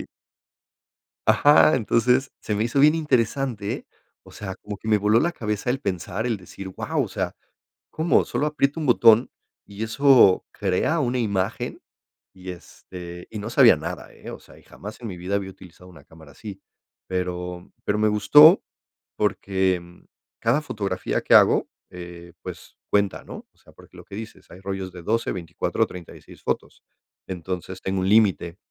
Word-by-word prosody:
Sí. - - -8 1.2
Ajá, 150 +1 +6
entonces 125 +3 +2
se 105 - -3
me 105 - 0
hizo 120 +4 -1
bien 150 +3 +6
interesante, 130 -7 -1 0.3
o - - -17
sea, 95 -2 -7
como 105 -1 -6
que 110 - -13
me 110 - +4
voló 105 +2 +3
la 170 +5 +1
cabeza 105 - -3
el 135 +2 -1
pensar, 100 +3 -3
el 115 -3 0
decir: 95 +1 -10
"Guau, 95 - -2
o - - -4
sea, - - -3 0.5
¿cómo? 160 +2 +1
solo - - -1
aprieto 145 0 0
un 160 - -3
botón 115 -2 +5 0.3
¿y 100 +1 -9
eso 115 -3 +5
crea 105 - 0
una 125 -2 0
imagen?" 100 -5 -2 0.5
Y 95 -1 -8
este 90 0 -11
y 110 - -7
no 105 +3 -5
sabía - - +6
nada, - - -7
¿eh?, - - -10
o - - -9
sea, - - -18
y - - -20
jamás 105 +4 -11
en 120 - -6
mi 90 - -7
vida 95 +3 -3
había 95 -1 -2
utilizado 90 -1 -15
una 80 -6 -16
cámara 80 -3 -16
así, 100 +4 -10 0.4
pero 90 -1 -4
pero 105 - 0
me 110 - +2
gustó 145 - +7 0.5
porque 95 -3 0 0.6
cada 145 - +2
fotografía 105 -10 -3
que - - +1
hago, - - +5 0.2
eh, 85 -1 -10
pues - - -10
cuenta, 100 -2 +1
¿no?, - - -10
o - - -38
sea, - - -21
porque - - -19
lo - - -12
que 100 - -11
dices, 110 +1 -10
hay 90 - -12
rollos 95 -1 -5
de 90 - -10
12 115 +6 -1
24 85 -3 -2
36 90 -2 -12
fotos, - - -4 0.4
entonces 90 +1 -6
tengo 95 0 -2
un 95 - 0
límite. 100 -5 +3
100 Hz, 170 wpm, -23 LUFS, 90-115 Hz, 1.2 s, gustó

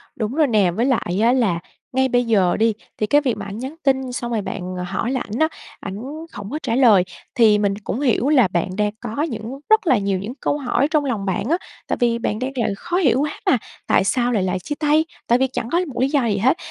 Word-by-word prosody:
Đúng 230 -1 -3
rồi 310 -2 +3
nè. 210 -7 +3
Với 225 +8 0
lại 215 -8 0
á, 235 - +5
là 215 -10 +1 0.3
ngay 265 +1 +3
bây 245 0 +2
giờ 195 -6 +2
đi, 225 0 +3 0.2
thì 215 - -1
cái 290 +7 +4
việc 255 -6 -1
mà 205 - -6
ảnh 200 +1 -6
nhắn 265 +5 -6
tin 265 -2 +1
xong 240 -1 -4
rồi 225 -2 0
bạn 185 -2 -5
hỏi 190 +6 -2
lại 260 -2 -1
ảnh 230 - -3
á, 315 - +4 0.3
ảnh 195 - -6 0.4
hổng 205 -1 -7
có 305 - -3
trả 230 -3 0
lời, 225 -8 +6 0.3
thì 220 -3 +5
mình 200 -1 +1
cũng 225 - -3
hiểu 270 -1 +2
là 265 -8 +5
bạn 175 +1 -1
đang 210 -1 +1
có 235 +4 -4
những 240 -2 -5
rất 435 -4 +4
là 260 - +5
nhiều 195 -2 0
những 205 +6 -5
câu 290 - 0
hỏi 275 0 +1
trong 300 -3 +2
lòng 225 -7 -2
bạn 190 -1 -1
á, 335 - +3 0.3
tại - - -1
vì 235 -2 +2
bạn 215 -2 -2
đang 260 +2 -2
là 235 - 0
khó 350 +11 -2
hiểu 265 -9 +3
quá 295 0 -3
mà. 260 - +4 0.3
Tại - - +4
sao 240 +5 +1
lại 210 -6 +1
là 185 0 0
chia 195 +11 -5
tay, 305 +1 +3 0.2
tại 240 - +4
vì 265 +1 +2
chẳng 245 -2 -4
có 340 - +3
một 250 -4 -4
lý 265 - +3
do 280 -4 +2
gì 210 -3 +1
hết. 255 - +3
240 Hz, 260 wpm, -21 LUFS, 205-270 Hz, 0.4 s, lời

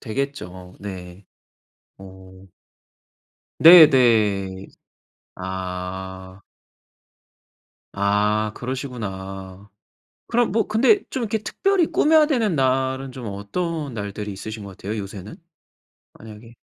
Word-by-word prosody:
되겠죠. 110 -8 -5
네. 95 -1 -9 0.7
어. 95 0 -14 1.2
네 165 +1 +10
네. 105 -7 +2 0.7
아. 95 0 -6 1.6
아 105 +2 +1
그러시구나. 100 -7 -7 0.6
그럼 240 -3 +1
뭐 225 +1 +1
근데 265 - +3
좀 260 - -4
이렇게 220 -1 -1
특별히 375 - +1
꾸며야 310 0 +4
되는 235 - 0
날은 130 -1 0
좀 125 -2 -8
어떤 140 - -4
날들이 105 -1 -5
있으신 110 +2 -7
것 100 - -9
같아요 105 +3 -5
요새는? 100 0 -8 0.8
만약에. 110 +1 -13
105 Hz, 185 characters per minute, -22 LUFS, 95-140 Hz, 1.6 s, 네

